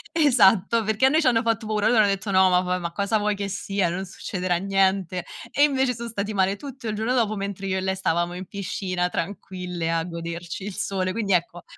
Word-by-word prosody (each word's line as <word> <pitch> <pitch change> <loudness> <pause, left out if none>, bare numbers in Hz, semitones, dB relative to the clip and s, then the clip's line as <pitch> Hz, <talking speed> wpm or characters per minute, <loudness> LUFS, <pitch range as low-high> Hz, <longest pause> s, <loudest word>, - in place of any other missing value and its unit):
Esatto, 230 - +4
perché 220 +4 +2
a - - +6
noi 315 +3 +3
ci 260 - +2
hanno 230 -2 +4
fatto 225 -1 0
paura. 215 -1 0
Loro 230 -1 +4
hanno 205 - +5
detto: 195 +1 -1
"No, 190 0 +5
ma 180 0 +4
va 180 0 -1
ma 170 -1 -4
cosa 200 +4 0
vuoi 210 0 0
che 200 0 -3
sia? 195 -2 -1
Non 185 +3 -3
succederà 180 -1 -3
niente". 190 -2 +1 0.3
E 285 - +3
invece 265 -3 +2
sono 235 0 -6
stati 210 -1 -3
male 195 0 +2
tutto 260 -1 -8
il 215 - -2
giorno 225 +4 -1
dopo, 220 -4 +1
mentre 195 -1 -4
io 190 0 0
e - - -1
lei 190 0 -1
stavamo 175 -1 0
in 185 +1 -6
piscina 185 -2 -2
tranquille 180 -2 -4
a 165 -1 0
goderci 170 +1 -6
il 205 -1 -5
sole. 185 -1 -1
Quindi 200 -2 -1
ecco 175 0 -1
195 Hz, 230 wpm, -24 LUFS, 180-220 Hz, 0.3 s, a